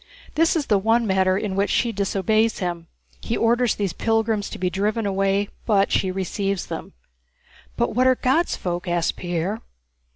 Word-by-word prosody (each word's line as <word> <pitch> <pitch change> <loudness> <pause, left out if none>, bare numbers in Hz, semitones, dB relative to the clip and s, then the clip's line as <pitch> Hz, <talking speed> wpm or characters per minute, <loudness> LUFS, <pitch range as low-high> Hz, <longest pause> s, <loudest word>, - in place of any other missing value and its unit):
This 330 +2 +3
is 310 -4 0
the 205 -5 +2
one 225 +3 +2
matter 190 -2 +2
in 200 -2 -3
which 200 +1 +1
she 235 - +1
disobeys 215 +2 +1
him. 175 -3 -4 0.3
He 230 - -2
orders 235 0 +2
these 200 -4 -2
pilgrims 225 -2 0
to - - -7
be 185 - -1
driven 205 +5 -1
away, 195 +1 +1 0.2
but 200 -3 +3
she 190 - +1
receives 195 +1 -2
them." - - -7 0.8
"But 120 - 0
what 255 +3 +3
are 260 - +5
'God's 265 +8 +1
folk'?" 175 0 -4
asked 175 -1 0
Pierre. 175 +4 -3
200 Hz, 170 wpm, -23 LUFS, 190-225 Hz, 0.8 s, are